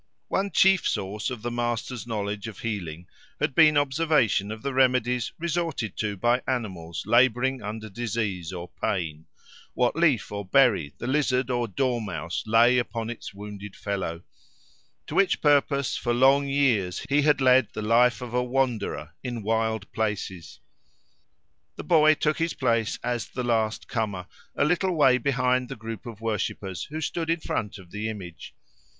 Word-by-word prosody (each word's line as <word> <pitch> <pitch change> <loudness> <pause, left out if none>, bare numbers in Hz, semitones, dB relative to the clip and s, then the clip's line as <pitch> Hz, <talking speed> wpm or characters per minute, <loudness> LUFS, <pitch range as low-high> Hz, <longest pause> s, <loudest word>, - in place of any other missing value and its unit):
—One 195 +1 0
chief 190 +1 +4
source 105 +2 -2
of 120 -4 -7
the 120 - -2
master's 120 0 -3
knowledge 105 -2 -3
of 110 - -8
healing 90 -7 -5 0.3
had - - 0
been 155 +1 +6
observation 145 -8 +2
of 110 0 -7
the 140 - -2
remedies 125 -2 +2
resorted 165 - -2
to 105 -2 -2
by 120 +5 +2
animals 95 -10 -3
labouring 130 +2 +3
under 110 +1 -6
disease 105 -5 -3
or 90 -1 -6
pain—what 80 - -3
leaf 155 -9 +2
or 100 0 -4
berry 95 - +3
the - - -6
lizard 130 -2 +1
or 120 -1 0
dormouse 105 -6 -2
lay 120 +3 +5
upon 115 -1 -3
its 120 - -8
wounded 100 0 -9
fellow; 95 -4 -4 0.8
to - - -8
which 195 -2 +3
purpose 140 -2 +2
for 120 0 -1
long 135 +3 +4
years 125 -10 +1
he 140 +1 +3
had 150 0 +3
led 130 -3 +5
the 105 - -5
life 120 +1 +3
of 120 -1 -7
a 125 - +2
wanderer, 125 - -1
in 120 -4 -4
wild 110 -1 -1
places. 100 -6 -4 1.1
The - - -7
boy 155 -2 +5
took 155 +1 0
his 165 0 -1
place 115 -4 0
as 120 -2 -2
the 125 - -4
last 110 -2 0
comer, 105 -7 -2 0.3
a - - +2
little 180 +3 +1
way 130 -4 +5
behind 125 -1 +1
the 135 - -5
group 110 0 -7
of 115 -2 -9
worshippers 105 -3 -3
who 155 +2 -6
stood 165 +1 -2
in 165 0 +1
front 105 -8 -3
of 90 -3 -15
the 105 +1 -3
image. 90 -7 -8
120 Hz, 160 wpm, -26 LUFS, 105-135 Hz, 1.1 s, been